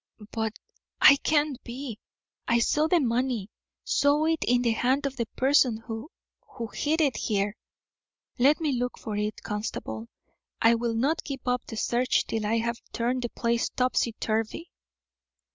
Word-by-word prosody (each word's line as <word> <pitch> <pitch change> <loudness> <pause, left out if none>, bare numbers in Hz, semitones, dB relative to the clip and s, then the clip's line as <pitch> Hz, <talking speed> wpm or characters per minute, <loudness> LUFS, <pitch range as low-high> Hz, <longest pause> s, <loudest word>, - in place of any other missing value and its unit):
"But 220 -1 -2 0.5
I 280 - +8
can't 295 -2 0
be. 240 -2 -6 0.5
I 235 - +4
saw 300 +6 +2
the 345 +1 +4
money; 240 -5 0 0.3
saw 290 +2 +2
it 325 0 +1
in 245 0 +3
the 235 - +3
hand 260 +5 +1
of 275 -1 -2
the 235 -3 -2
person 260 -3 +4
who 225 +4 -7 0.6
hid 315 +2 +1
it 280 -4 +2
there. 205 0 0 0.8
Let 280 +6 +5
me 310 -3 0
look 250 -1 -2
for 215 - -5
it, 210 +1 -3
constable. 210 - -4 0.5
I 230 +1 +5
will 230 0 -1
not 280 +8 +1
give 275 -3 -5
up 250 0 0
the 225 - -7
search 245 +3 +1
till 220 -2 -2
I 225 +2 +2
have 235 +1 -2
turned 245 +2 -1
the 240 - -2
place 235 0 0
topsy 250 -2 0
turvy." 225 +9 -2
240 Hz, 160 wpm, -27 LUFS, 225-275 Hz, 0.8 s, I